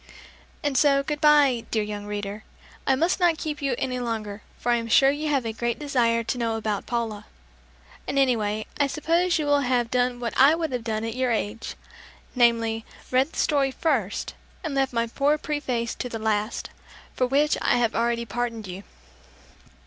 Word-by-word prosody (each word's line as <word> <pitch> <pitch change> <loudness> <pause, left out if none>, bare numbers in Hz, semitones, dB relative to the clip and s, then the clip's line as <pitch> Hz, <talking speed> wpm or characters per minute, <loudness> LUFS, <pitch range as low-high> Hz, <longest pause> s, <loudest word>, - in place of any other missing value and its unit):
And 290 -2 0
so 275 -2 +4
good 295 +1 -3
bye, 290 -6 +5
dear 220 -2 0
young 205 0 -6
reader! 205 0 -5 0.4
I 265 - +4
must 335 +8 +1
not 345 -3 +3
keep 300 -2 -4
you 275 -3 0
any 255 -1 -2
longer, 220 -4 -4 0.2
for 245 - -1
I 240 - +4
am 230 -1 -4
sure 270 +4 +5
you 300 +2 -3
have 275 -5 +1
a 225 - -2
great 235 +1 -2
desire 240 -6 +1
to 245 - -2
know 230 -1 0
about 215 -2 -3
Paula; 230 -4 -3 0.8
and 275 - -2
anyway, 215 -5 +1
I 285 - +3
suppose 335 +4 +1
you 305 - -1
will 290 0 +3
have 245 -3 0
done 245 -1 +1
what 235 -2 -3
I 275 +4 +6
would 325 -3 -2
have 250 -2 -3
done 220 -1 -2
at 225 0 -3
your 255 0 0
age, 225 -1 -2 0.6
namely, 230 -2 +2 0.3
read 260 +5 +2
the - - -9
story 280 -3 +2
first, 260 - -1 0.3
and 320 -4 -3
left 270 -1 +1
my 230 -1 0
poor 280 +6 +1
preface 260 -7 -2
to 250 - -3
the 230 - -4
last 215 0 -1 0.4
for 255 - +1
which 290 +4 +2
I - - +3
have 235 -2 +1
already 235 0 0
pardoned 230 0 -3
you! 185 0 -7
245 Hz, 190 wpm, -25 LUFS, 225-280 Hz, 0.8 s, I